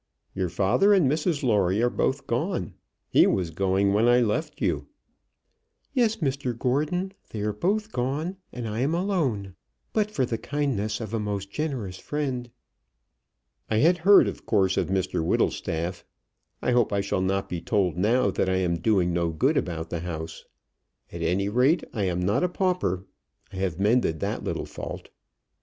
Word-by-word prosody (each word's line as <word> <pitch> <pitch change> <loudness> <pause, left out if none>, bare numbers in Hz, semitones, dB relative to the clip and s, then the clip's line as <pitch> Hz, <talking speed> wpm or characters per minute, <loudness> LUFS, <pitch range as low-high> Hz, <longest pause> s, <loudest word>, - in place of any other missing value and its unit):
Your 95 -2 -1
father 120 - +3
and 180 -8 +4
Mrs 150 +2 0
Lawrie 100 -5 +2
are - - +4
both 135 0 0
gone. 125 - -2 0.3
He - - +5
was 90 -4 0
going 95 +3 +1
when 110 +3 +3
I 120 0 +6
left 125 +7 -1
you." - - -1 1.1
"Yes, 235 -4 +2
Mr 135 - -2
Gordon. 150 +10 0 0.2
They 105 - -5
are 105 0 -1
both 210 - -1
gone, 150 - -2
and 120 -2 -5
I 110 +1 -3
am 140 +6 +1
alone, 145 - -1 0.4
but 215 -1 +1
for 140 -11 0
the 115 -2 -3
kindness 120 -8 -1
of 110 -1 -6
a 115 - 0
most 100 -2 -3
generous 125 -12 -3
friend." 130 -5 -3 1.2
"I 110 - +1
had 170 +8 +4
heard, 195 +4 +7
of - - -6
course, 95 -4 +3
of - - 0
Mr 95 -3 -1
Whittlestaff. 85 +2 -1 0.6
I - - +2
hope 120 -3 +3
I 100 -1 +1
shall 100 -1 -1
not 95 +1 0
be 85 -2 -4
told 90 -1 +1
now 105 +3 +2
that 95 - 0
I 95 - +1
am 90 -2 +1
doing 90 -2 +2
no 85 -1 +1
good 80 -2 +1
about 80 -2 -2
the 85 - -2
house. 80 -2 -6 0.7
At - - -7
any 100 +3 +1
rate 130 - +3
I 105 -4 -1
am 90 -1 -1
not 100 - +1
a 180 - +2
pauper. 180 - 0 0.5
I - - -7
have 95 -3 -2
mended 105 -6 +2
that - - -2
little - - -3
fault." - - -7
110 Hz, 175 wpm, -26 LUFS, 95-145 Hz, 1.2 s, heard